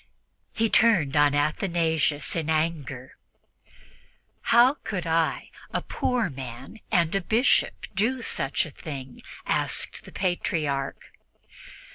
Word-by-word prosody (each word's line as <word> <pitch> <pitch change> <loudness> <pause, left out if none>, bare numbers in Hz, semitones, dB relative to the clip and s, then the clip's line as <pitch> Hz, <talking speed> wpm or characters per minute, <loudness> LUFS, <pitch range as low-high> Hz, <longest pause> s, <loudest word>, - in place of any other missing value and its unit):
He 225 0 +1
turned 190 -12 +4
on 145 -1 +4
Athanasius 155 -1 0
in 160 -2 -2
anger. 155 -5 -2 1.3
"How 240 +3 +6
could 185 -5 -3
I, 165 -1 0 0.2
a - - -1
poor 250 -3 0
man 130 - -8
and 170 -1 +2
a 195 - +1
Bishop, 225 +8 +2
do 230 +6 0
such 135 - 0
a 155 - -9
thing?" 135 -4 -8 0.2
asked - - -1
the - - -13
Patriarch. 155 -7 -2
160 Hz, 110 wpm, -26 LUFS, 145-195 Hz, 1.3 s, How